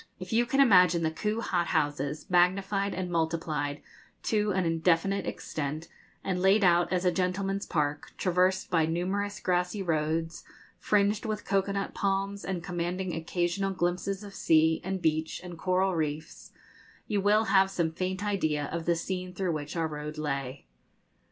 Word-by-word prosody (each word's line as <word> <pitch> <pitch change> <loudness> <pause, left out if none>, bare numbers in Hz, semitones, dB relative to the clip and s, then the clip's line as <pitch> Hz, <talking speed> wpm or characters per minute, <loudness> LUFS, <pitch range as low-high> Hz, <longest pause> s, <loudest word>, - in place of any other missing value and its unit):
If 185 +3 -6
you 240 +1 +3
can 270 +2 0
imagine 180 -9 +6
the 160 - +1
Kew 210 +7 -2
hot 175 -6 0
houses 150 -1 -1
magnified 195 +3 +2
and 180 -1 -3
multiplied 160 -3 -1 0.4
to 210 -1 +1
an 190 -2 +1
indefinite 165 +4 +1
extent, 155 +2 -4 0.3
and 180 -2 -1
laid 195 +3 +4
out 175 -1 +4
as 185 0 0
a 180 - +4
gentleman's 195 +2 -1
park, 150 -2 -1
traversed 185 +1 +1
by 165 -3 +3
numerous 190 +5 -2
grassy 180 +2 0
roads 160 0 -1 0.4
fringed 210 +2 +1
with 215 -1 -3
cocoa 195 0 +1
nut 195 0 -3
palms, 195 0 -1
and 180 -3 -3
commanding 180 +1 -3
occasional 175 +4 -1
glimpses 185 +3 -1
of 200 -1 -10
sea, 160 -2 +3
and 190 0 -3
beach, 160 0 0
and 175 -2 -9
coral 185 +1 +1
reefs, 155 -1 -4 0.5
you 205 -2 0
will 210 +2 +4
have 195 -3 +4
some 170 -4 -1
faint 185 +4 -3
idea 155 -8 0
of 170 -1 -3
the 170 - +2
scene 180 +1 -4
through 185 -1 -1
which 150 -1 -4
our 165 -1 0
road 150 0 -6
lay. 140 -3 -3
180 Hz, 160 wpm, -29 LUFS, 160-195 Hz, 0.5 s, imagine